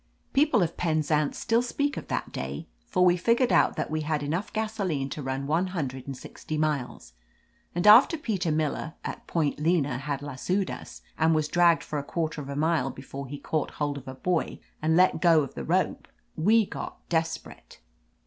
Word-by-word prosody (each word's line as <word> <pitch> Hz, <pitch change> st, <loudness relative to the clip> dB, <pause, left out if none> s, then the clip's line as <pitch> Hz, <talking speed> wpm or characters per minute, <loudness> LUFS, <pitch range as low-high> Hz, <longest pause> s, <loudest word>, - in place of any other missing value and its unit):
People 270 Hz, -, +4 dB
of 170 Hz, 0 st, -3 dB
Penzance 155 Hz, -3 st, +1 dB
still 230 Hz, 0 st, +2 dB
speak 285 Hz, +3 st, -1 dB
of -, -, -6 dB
that -, -, -3 dB
day, 65 Hz, +2 st, -5 dB, 0.2 s
for 180 Hz, -, +3 dB
we 175 Hz, -1 st, +5 dB
figured 235 Hz, +7 st, +2 dB
out -, -, +4 dB
that -, -, -3 dB
we 155 Hz, 0 st, -1 dB
had 150 Hz, -1 st, -1 dB
enough 165 Hz, +8 st, -2 dB
gasoline 200 Hz, -11 st, -2 dB
to 150 Hz, -, -5 dB
run 135 Hz, 0 st, -3 dB
one 165 Hz, +6 st, +1 dB
hundred 135 Hz, -4 st, -4 dB
and 135 Hz, -2 st, -5 dB
sixty 155 Hz, -, -6 dB
miles, 145 Hz, -, -2 dB, 0.6 s
and 175 Hz, -, 0 dB
after 230 Hz, +10 st, +8 dB
Peter 195 Hz, -, -1 dB
Miller, 155 Hz, +1 st, -1 dB
at -, -, -6 dB
Point 155 Hz, -4 st, 0 dB
Lena, 150 Hz, -5 st, +1 dB
had 140 Hz, 0 st, -4 dB
lassoed 180 Hz, +8 st, -1 dB
us -, -, -9 dB, 0.2 s
and 160 Hz, 0 st, +4 dB
was 155 Hz, -1 st, +1 dB
dragged 170 Hz, 0 st, +4 dB
for 150 Hz, -, -3 dB
a -, -, -5 dB
quarter 160 Hz, 0 st, -3 dB
of 140 Hz, -, -8 dB
a 140 Hz, -, -4 dB
mile 160 Hz, -1 st, +1 dB
before 135 Hz, +1 st, -8 dB
he 145 Hz, +3 st, -6 dB
caught 155 Hz, +1 st, -2 dB
hold 145 Hz, -1 st, -1 dB
of 135 Hz, -, -17 dB
a 130 Hz, -, -6 dB
buoy 175 Hz, +5 st, -1 dB, 0.2 s
and 160 Hz, +1 st, +2 dB
could -, -, +4 dB
let 185 Hz, +1 st, +4 dB
go 165 Hz, -3 st, +6 dB
of 135 Hz, -, -7 dB
the 70 Hz, -, -6 dB
rope, -, -, 0 dB, 0.3 s
we 215 Hz, +7 st, +4 dB
got -, -, -8 dB
desperate. 165 Hz, -1 st, -3 dB
155 Hz, 195 wpm, -27 LUFS, 145-180 Hz, 0.6 s, after